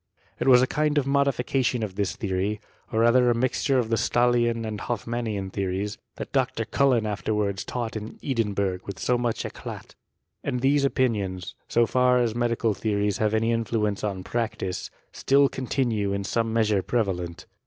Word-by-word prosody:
It. - - -1
was 125 -1 +7
a - - +5
kind 150 +2 0
of 145 - +2
modification 135 -3 +1
of 105 -3 -4
this 100 -1 -1
theory, 100 +1 -1 0.3
or 110 - +1
rather 120 +1 +5
mixture 130 +3 +1
of 120 -3 0
the 115 - +2
Stahlian 120 -1 +2
and 105 -1 -4
Hoffmannian 115 -4 -3
theories, 100 +2 -2 0.2
that. - - -7
Dr. - - 0
Cullen 130 -5 +2
afterwards 105 -1 -1
taught 120 -3 -4
in 110 +1 -5
Edinbui^h 100 -7 -1
ynik 100 +7 -1
much 120 -2 -1
eclat. - - -8 0.5
And 125 - -2
these 140 +2 +3
opinions, 100 -9 -1
so 120 0 +3
far 125 +1 +3
as 120 -3 +1
medical 115 -1 +1
theories 105 -1 -1
have 110 0 +2
any 115 +1 +2
influence 110 -3 -1
on 100 -3 -2
practice, 110 -6 -3 0.2
still 140 +1 +3
contino^, 120 -7 -1
in 100 - -2
some 115 +3 0
measure 110 -3 +2
prevalent. 90 -7 -2
115 Hz, 160 wpm, -25 LUFS, 100-125 Hz, 0.5 s, was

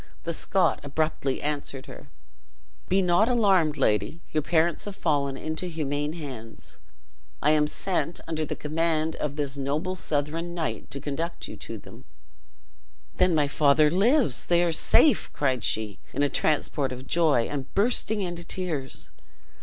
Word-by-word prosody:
The 170 - -2
Scot 190 +3 +1
abruptly 145 -2 -1
answered 145 -2 -3
her: - - -11 0.8
"Be 190 +1 +3
not 180 +6 +3
alarmed, 190 -10 +3
lady, 105 - +1
your 155 - +1
parents 165 +2 +1
have 205 -1 -6
fallen 140 -6 0
into 160 +5 -4
humane 150 -2 -2
hands. 130 -9 -8 0.6
I 150 - +3
am 150 -1 +3
sent, 175 +1 -1
under 160 -1 -2
the 150 - -3
command 160 +1 0
of 145 -1 -3
this 145 -2 -2
noble 145 +7 -1
Southron 165 +1 -2
knight, 165 -2 -3
to 140 - -5
conduct 150 +5 -4
you - - -8
to - - -7
them." - - -14 1.1
"Then 180 -2 +3
my 150 -2 +3
father 150 +1 +4
lives! 205 - +3
They 175 0 +4
are 170 - +1
safe!" 290 - +4
cried 130 -5 0
she, 110 -2 0
in 145 - +1
a 145 - +2
transport 145 -2 0
of 130 +1 -7
joy, 155 -5 +3
and 140 -2 -5
bursting 220 0 +2
into 175 -2 -4
tears. 170 -7 -3
155 Hz, 155 wpm, -26 LUFS, 140-175 Hz, 1.1 s, father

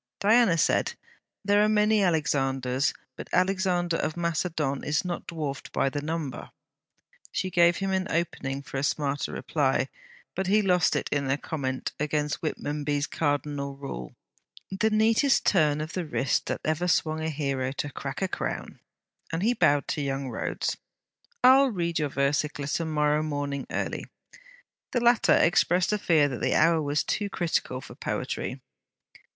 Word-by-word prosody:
Diana 220 -4 +4
said: - - +1 0.5
'There 205 +1 +4
are 215 - +3
many 210 0 +3
Alexanders, 135 -4 +1 0.2
but - - -9
Alexander 180 -2 +1
of 155 - -2
Macedon 160 -4 -1
is 150 +4 0
not 175 -1 -4
dwarfed 150 -5 -5
by 135 - +1
the 145 +1 -4
number.' 155 -4 -4 0.8
She 185 - -2
gave 170 -1 +4
him 195 -1 -2
an 190 0 0
opening 140 -5 -2
for 135 - -6
a 135 - -1
smarter 145 -1 -1
reply, - - 0 0.4
but 190 -1 -2
he 210 +2 +3
lost 180 -3 +3
it - - -1
in 140 -2 0
a 135 - +2
comment 135 -4 -3
against 150 -1 -1
Whitmonby's 145 -2 -2
cardinal 145 -2 -2
rule: 65 - -7 0.6
'The 195 +3 +1
neatest 225 +5 +3
turn 150 -6 +3
of 155 +1 -6
the 180 - -2
wrist 135 -3 0
that - - -2
ever 155 +3 0
swung 160 -2 +1
a 160 - -1
hero 135 -4 -2
to 145 0 -4
crack 140 +6 -5
a - - +2
crown!' - - -4 0.5
and 165 +3 -2
he 235 +3 +3
bowed 145 - +2
to 150 - -1
young 135 -1 -2
Rhodes: 115 - -2 0.7
'I 260 +1 +9
'll 275 -1 +4
read 170 -6 -1
your 150 -1 0
versicler 145 +1 0
to 165 - -2
morrow 150 -1 +1
morning 145 -2 -3
early.' - - -3 0.9
The 245 - +2
latter 240 0 +4
expressed 180 +2 +3
a 210 - 0
fear 155 -6 +3
that 130 -4 -5
the - - +1
hour 165 +1 +4
was 145 0 0
too 205 -1 -1
critical 160 -8 -1
for - - -11
poetry. - - -4
155 Hz, 160 wpm, -27 LUFS, 140-180 Hz, 0.9 s, I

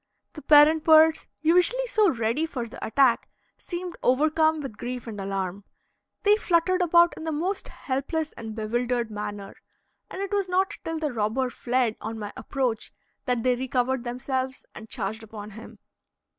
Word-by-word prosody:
The 305 - -9
parent 305 +1 +6
birds, 320 0 +5 0.2
usually 360 +10 +3
so 435 -5 +3
ready 235 +6 0
for 255 -7 -4
the - - -10
attack, 255 0 +2 0.3
seemed 350 0 -6
over 285 +5 +3
come 315 0 +2
with 270 -7 -7
grief 245 +2 -5
and 215 -4 -6
alarm. 195 0 -3 0.6
They 415 0 +5
fluttered 365 -1 +2
about 345 0 +5
in - - -7
the 320 - -2
most 355 +6 -2
helpless 295 +4 -3
and 220 -2 -8
bewildered 235 +1 -1
manner, 205 -1 -6 0.5
and - - -7
it 395 +1 -3
was 400 -2 0
not 380 +2 +1
till 325 0 -3
the 305 -4 -2
robber 235 +4 0
fled 245 -3 0
on 225 +1 -5
my 210 -1 -6
approach 255 -5 -2 0.3
that 245 -3 0
they 250 -1 +3
recovered 255 0 -1
themselves 260 +1 -3
and 220 - -11
charged 220 -1 -4
upon 215 -1 -9
him. 220 +3 -11
260 Hz, 165 wpm, -26 LUFS, 225-320 Hz, 0.6 s, parent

